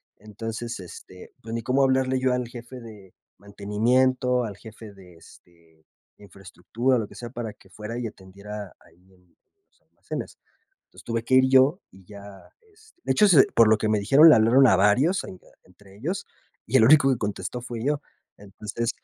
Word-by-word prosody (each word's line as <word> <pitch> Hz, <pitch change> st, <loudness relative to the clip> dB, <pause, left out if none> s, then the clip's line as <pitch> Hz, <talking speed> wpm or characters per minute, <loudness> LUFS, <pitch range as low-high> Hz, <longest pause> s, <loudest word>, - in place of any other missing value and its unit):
Entonces, 115 Hz, +2 st, -7 dB
este, 90 Hz, 0 st, -13 dB
pues, 115 Hz, -, -8 dB
ni 115 Hz, -, -3 dB
cómo 130 Hz, +4 st, +1 dB
hablarle 130 Hz, -1 st, +1 dB
yo 130 Hz, -1 st, +1 dB
al 125 Hz, -1 st, -2 dB
jefe 120 Hz, +1 st, -11 dB
de 105 Hz, -5 st, -14 dB, 0.2 s
mantenimiento, 125 Hz, +5 st, 0 dB
al 105 Hz, -3 st, -7 dB
jefe 110 Hz, 0 st, -13 dB
de, 90 Hz, -3 st, -17 dB
este, 80 Hz, -1 st, -22 dB, 0.3 s
infraestructura, 105 Hz, +6 st, -3 dB
lo 105 Hz, -, -5 dB
que -, -, -16 dB
sea 120 Hz, -1 st, -9 dB
para 120 Hz, -4 st, -6 dB
que 105 Hz, -, -22 dB
fuera 110 Hz, +3 st, -7 dB
y 120 Hz, -, -4 dB
atendiera 100 Hz, 0 st, -10 dB
ahí 95 Hz, +2 st, -26 dB
en 90 Hz, -1 st, -27 dB, 0.3 s
en 400 Hz, -, -52 dB
los -, -, -39 dB
almacenes. -, -, -9 dB, 0.5 s
Entonces -, -, -18 dB
tuve 115 Hz, -1 st, -3 dB
que 130 Hz, -, -2 dB
ir 130 Hz, 0 st, +4 dB
yo 135 Hz, +7 st, +4 dB
y 95 Hz, -1 st, -19 dB
ya, 100 Hz, 0 st, -13 dB, 0.5 s
este 440 Hz, -3 st, -25 dB
de -, -, -1 dB
hecho 210 Hz, -, +4 dB
se 160 Hz, -9 st, +6 dB
por 115 Hz, -2 st, +5 dB
lo 110 Hz, -, +4 dB
que 110 Hz, 0 st, -2 dB
me 110 Hz, -1 st, +1 dB
dijeron 140 Hz, +10 st, +6 dB
le -, -, +7 dB
hablaron 120 Hz, +4 st, +4 dB
a 95 Hz, -, +4 dB
varios 125 Hz, -, +2 dB
ahí 95 Hz, -, -10 dB, 0.3 s
entre 95 Hz, +2 st, -20 dB
ellos, 170 Hz, -, -4 dB, 0.4 s
y -, -, +2 dB
el 110 Hz, -, +5 dB
único 140 Hz, 0 st, +5 dB
que 125 Hz, -, -1 dB
contestó 105 Hz, +1 st, -5 dB
fui 120 Hz, 0 st, -7 dB
yo. 145 Hz, 0 st, -1 dB, 0.4 s
Entonces 105 Hz, +3 st, -6 dB
115 Hz, 190 wpm, -24 LUFS, 100-130 Hz, 0.5 s, le